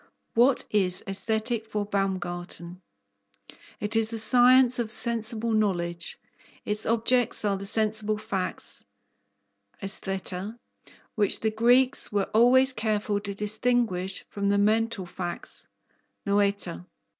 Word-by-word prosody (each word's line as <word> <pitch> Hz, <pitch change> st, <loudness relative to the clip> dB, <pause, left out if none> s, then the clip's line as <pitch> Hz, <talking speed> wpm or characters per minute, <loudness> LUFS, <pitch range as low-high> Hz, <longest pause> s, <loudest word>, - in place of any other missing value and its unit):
What 245 Hz, +3 st, +3 dB
is 190 Hz, -3 st, +1 dB
Aesthetic 220 Hz, +3 st, -2 dB
for 210 Hz, -1 st, -3 dB
Baumgarten? 180 Hz, -3 st, -4 dB, 1.0 s
It 210 Hz, +2 st, -2 dB
is 225 Hz, -1 st, +3 dB
the 230 Hz, -, -2 dB
science 250 Hz, +2 st, +5 dB
of 225 Hz, -2 st, -2 dB
sensible 230 Hz, -1 st, 0 dB
knowledge. 175 Hz, -6 st, -2 dB, 0.5 s
Its 210 Hz, +1 st, -3 dB
objects 230 Hz, 0 st, +1 dB
are 200 Hz, -1 st, +1 dB
the 195 Hz, +1 st, -6 dB
sensible 215 Hz, 0 st, +2 dB
facts 200 Hz, -4 st, -3 dB, 1.0 s
(aisthaeta), 195 Hz, +1 st, -3 dB, 0.6 s
which 205 Hz, -2 st, +1 dB
the 220 Hz, -, 0 dB
Greeks 245 Hz, +4 st, +3 dB
were 200 Hz, -2 st, -1 dB
always 255 Hz, +4 st, +5 dB
careful 215 Hz, -2 st, -1 dB
to 200 Hz, -1 st, -6 dB
distinguish 210 Hz, -3 st, -1 dB
from 200 Hz, -1 st, -2 dB
the 200 Hz, -, +2 dB
mental 215 Hz, -1 st, +1 dB
facts 175 Hz, 0 st, -5 dB, 0.6 s
(noaeta). 200 Hz, -, -1 dB
215 Hz, 110 wpm, -26 LUFS, 195-230 Hz, 1.0 s, science